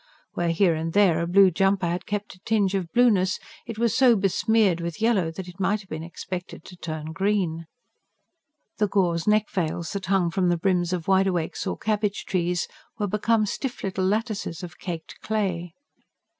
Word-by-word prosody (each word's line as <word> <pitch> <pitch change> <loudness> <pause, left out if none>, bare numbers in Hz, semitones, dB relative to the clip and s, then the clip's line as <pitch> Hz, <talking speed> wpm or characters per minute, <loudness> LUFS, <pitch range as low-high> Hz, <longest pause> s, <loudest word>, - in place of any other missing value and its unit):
Where, 175 -1 0
here 170 +1 +3
and 160 +1 -3
there, 185 -5 +4
a 170 - -1
blue 190 +1 +6
jumper 195 +2 +2
had 175 +1 -2
kept 205 0 -3
a 185 - -19
tinge 205 -1 +1
of 180 -4 -2
blueness, 205 -6 +3 0.3
it 230 -2 -6
was 235 -1 +1
so 255 -3 +6
besmeared 200 -2 +2
with 170 +1 -4
yellow 215 -7 +2
that 180 +3 -7
it 180 +2 -12
might 200 +2 +1
have 190 - -19
been 155 0 -4
expected 175 +1 -7
to 180 - -11
turn 155 -2 -5
green. 180 -3 -1 1.1
The 210 - +3
gauze 180 -4 +1
neck 210 0 +3
veils 170 -3 -2
that 195 -2 -4
hung 185 -3 +2
from 180 +1 +1
the 175 - +2
brims 175 -1 +1
of 175 -3 -3
wide 195 0 +4
awakes 175 +1 -2
or - - -2
cabbage 210 -1 -1
trees 175 -1 0 0.3
were 210 - 0
become 215 +2 +1
stiff 250 +5 -4
little 190 -1 -1
lattices 210 -4 -2
of 175 0 -9
caked 170 -3 -6
clay. 180 -6 -2
190 Hz, 185 wpm, -25 LUFS, 170-205 Hz, 1.1 s, blue